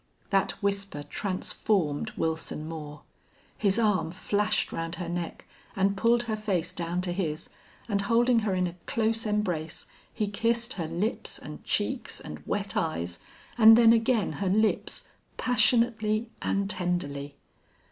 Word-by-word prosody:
That 195 -1 +2
whisper 195 -6 -1
transformed 185 0 -1
Wilson 160 -1 -2
Moore. 150 -2 -7 0.5
His 200 -1 +2
arm 210 -7 +2
flashed 205 +4 0
round 165 +1 -3
her 175 -1 -5
neck 175 0 -4 0.3
and 195 +1 +2
pulled 235 +4 +3
her 225 -2 -2
face 200 -6 -1
down 170 +1 -2
to 180 -1 -2
his, 160 -5 -3 0.4
and, 200 -3 +1
holding 235 +3 +3
her 210 -4 0
in 180 0 +1
a 175 - -3
close 225 -2 0
embrace, 180 -7 -1 0.3
he 215 - -1
kissed 230 +4 0
her 170 -4 -3
lips 175 +8 -2
and - - -9
cheeks - - -1
and - - -8
wet 200 0 -2
eyes, 85 - -2 0.4
and 225 0 +10
then 230 -1 +7
again 230 -1 +2
her 195 - +1
lips, 215 +3 +1 0.3
passionately 230 -2 +2
and 200 0 0
tenderly. 145 -7 -2
200 Hz, 140 wpm, -28 LUFS, 170-220 Hz, 0.5 s, and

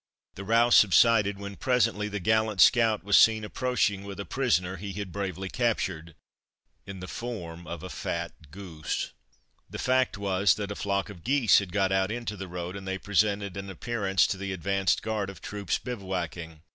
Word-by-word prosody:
The 100 - -8
row 115 +4 +3
subsided, 105 -1 +5
when 100 0 -8
presently 115 -6 +1
the 105 0 -4
gallant 110 0 +1
scout 115 -3 +5
was 100 0 +2
seen 110 -1 +6
approaching 105 -3 0
with 100 0 -8
a 100 - -4
prisoner 95 -8 0
he 100 +2 -6
had 100 -1 -5
bravely 95 -1 -4
captured 95 -8 -2 0.7
in 95 -2 -8
the 90 - -6
form 85 -8 -6
of 85 -2 -6
a 95 - -6
fat 85 -3 -5
goose. 85 -3 -5 0.6
The - - -7
fact 130 -3 +1
was 100 -1 +2
that 100 -1 -4
a - - -4
flock 100 +1 -2
of 85 -5 -13
geese 130 -2 +4
had 100 -3 -6
got 95 -1 +1
out 95 +1 +1
into 115 -2 -4
the 95 -1 -7
road, 90 +1 -6
and 95 -1 -8
they 95 0 -2
presented 100 0 0
an 100 0 -6
appearance 95 -1 0
to 95 - -2
the 100 0 -4
advanced 95 +1 0
guard 105 -3 -2
of 95 - -10
troops 105 -1 -3
bivouacking. 90 -8 -5
100 Hz, 185 wpm, -27 LUFS, 95-110 Hz, 0.7 s, seen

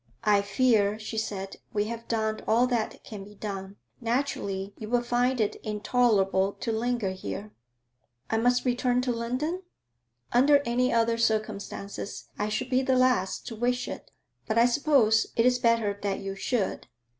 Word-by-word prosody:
'I 205 -1 +4
fear,' 205 0 +2
she 220 +1 -4
said, 195 -3 -4 0.2
'we 205 -1 +1
have 230 +1 -6
done 220 -1 -1
all 235 +3 +4
that 240 -3 -2
can 205 -3 -8
be 210 +1 -13
done. 195 -1 -6 0.2
Naturally 225 -6 -2
you 215 - -6
would 240 0 +1
find 245 +1 +1
it 210 -2 0
intolerable 210 -3 +1
to 230 - -3
linger 230 -3 0
here.' 200 +2 -6 0.8
'I 225 - +2
must 245 +2 +2
return 250 0 +2
to 250 0 0
London?' 255 +10 -2 0.7
'Under 280 +4 +5
any 250 +2 +1
other 230 0 +2
circumstances 215 -3 -2
I 210 +1 0
should 250 +5 -3
be 255 +1 +3
the 260 -1 +2
last 250 -7 +2
to 230 - -6
wish 245 +2 0
it, - - -7 0.4
but 220 - 0
I 230 - +6
suppose 245 -4 +3
it 230 - +3
is 250 0 +4
better 230 -4 +2
that 200 -1 -1
you 195 0 -5
should.' 195 +1 -2
230 Hz, 165 wpm, -27 LUFS, 205-245 Hz, 0.8 s, I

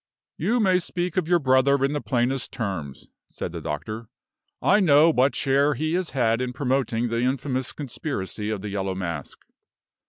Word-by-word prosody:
"You 220 +10 +1
may 190 -4 +4
speak 175 0 -3
of 185 -4 0
your 175 0 +4
brother 135 -1 +3
in 140 - -1
the 145 - -2
plainest 125 +1 -1
terms," 95 - -5 0.2
said - - -6
the - - -6
doctor. 110 +10 -5 0.5
"I 205 - +4
know 160 -3 +6
what 130 -2 +2
share 140 +2 +2
he 155 +5 -1
has 180 -1 -1
had 120 -3 +1
in 125 -1 -2
promoting 125 -3 0
the 115 +1 -1
infamous 130 0 -1
conspiracy 115 -7 -4
of 105 -3 -3
the 105 - -4
Yellow 95 -1 -2
Mask." 85 -6 -5
130 Hz, 175 wpm, -24 LUFS, 115-150 Hz, 0.5 s, know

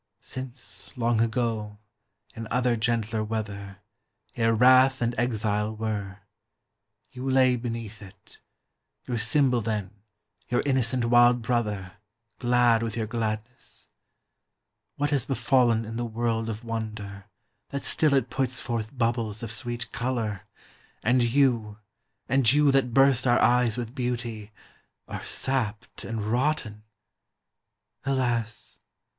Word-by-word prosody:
Since, 125 -6 -7
long 115 -1 +2
ago, 110 -3 -1 0.6
in 115 -1 -6
other 125 0 +1
gentler 110 -1 0
weather 100 -3 -5 0.5
Ere 115 -1 +2
wrath 130 +3 +6
and 120 0 0
exile 110 -3 -1
were, 100 -3 -4 0.9
you 130 +1 -4
lay 130 -1 +4
beneath 115 -3 -5
it, 100 +1 -14 0.6
(Your 120 -2 -2
symbol 125 +2 +3
then, 105 -3 -2 0.6
your 120 - +1
innocent 130 -3 +1
wild 120 0 +5
brother, 105 -5 -2 0.4
Glad 120 -2 +3
with 115 -1 -3
your 110 - -1
gladness,) 115 +1 -5 1.1
What 145 0 -1
has 140 -5 +1
befallen 125 -3 +2
in 115 +1 -6
the 120 - -2
world 115 0 -1
of 110 +1 -5
wonder, 110 -4 -5 0.4
That 140 0 -4
still 150 -3 +3
it 130 -2 0
puts 130 -1 -1
forth 115 +1 -4
bubbles 115 -3 -1
of 115 - -4
sweet 120 +1 -4
color, 115 -6 -3 0.6
And 125 +2 +3
you, 120 -4 +2 0.5
and 130 -2 +4
you 145 0 +4
that 135 -2 +2
burst 135 0 +4
our 120 - +5
eyes 120 -2 +3
with 120 -1 -4
beauty, 120 -5 -4 0.6
Are - - -6
sapped 115 -6 -2
and 115 -2 -4
rotten? 115 -3 -1 1.2
Alas! 120 -4 -2
115 Hz, 120 wpm, -26 LUFS, 110-125 Hz, 1.2 s, wrath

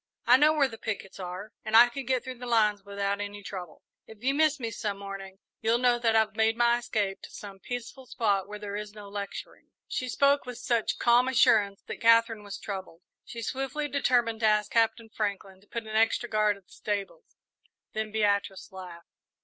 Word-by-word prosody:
I 245 - +7
know 300 +2 +5
where 290 -3 +3
the 225 -3 -10
pickets 200 -3 -5
are 185 +3 -6
and 220 +1 +4
I 240 +1 +9
could 240 +1 -7
get 260 -2 +1
through 255 -2 -7
the 245 - -7
lines 210 -4 +2
without 200 0 -2
any 205 0 -6
trouble. 180 -5 -8 0.2
If 220 0 -14
you 270 +1 +2
miss 305 0 +3
me 230 -3 -3
some 205 -2 -3
morning, 195 -1 -8 0.2
you'll 225 +1 +3
know 245 -1 +3
that 230 -2 +2
I've 220 -1 +2
made 225 +1 +2
my 240 0 +4
escape 205 -4 -2
to - - -10
some 200 -2 -10
peaceful 245 +3 -7
spot 200 -5 0
where 210 0 -7
there 205 -1 -6
is 210 0 -5
no 205 -1 -10
lecturing." 200 0 -7 0.2
She 255 - -3
spoke 280 +3 +3
with 250 -1 -6
such 235 -3 0
calm 240 +1 +4
assurance 215 -6 +3
that - - -8
Katherine 230 -1 +4
was 200 -1 -7
troubled. 190 -4 -7 0.2
She 230 -1 -7
swiftly 270 +5 -2
determined 245 -5 +1
to 220 - +3
ask 210 -1 +2
Captain 225 0 +2
Franklin 200 -3 -4
to 205 - -24
put 235 +2 -4
an 215 0 -6
extra 225 +2 +2
guard 215 -2 +2
at 195 - -21
the - - -20
stables, 210 - -5 0.6
then 215 0 -3
Beatrice 205 -2 0
laughed. 180 -3 -10
220 Hz, 205 wpm, -28 LUFS, 200-240 Hz, 0.6 s, I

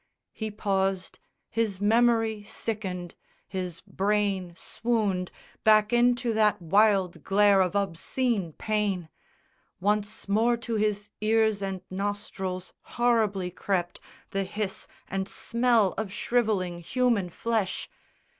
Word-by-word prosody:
He 220 -1 -4
paused; 195 -2 -1 0.3
his 215 -4 -1
memory 225 0 +3
sickened, 205 -4 -4 0.3
his 180 -3 -4
brain 195 -3 -1
swooned 205 -7 -1 0.3
Back 215 0 +5
into 240 0 +3
that 210 -1 +3
wild 195 +1 +3
glare 200 0 +5
of 185 +1 0
obscene 200 0 0
pain! 205 -5 -1 0.7
Once 210 +2 -1
more 225 +4 +3
to 235 0 -5
his 210 -1 0
ears 220 -1 +2
and 195 -2 -3
nostrils 190 -2 -4 0.2
horribly 215 -6 +2
crept 175 -1 -2 0.3
The 195 0 0
hiss 200 0 -4 0.2
and 195 0 -3
smell 235 -4 +2
of 215 -3 -3
shrivelling 210 -5 0
human 225 +1 +1
flesh! 220 +1 -2
205 Hz, 110 wpm, -27 LUFS, 190-220 Hz, 0.7 s, Back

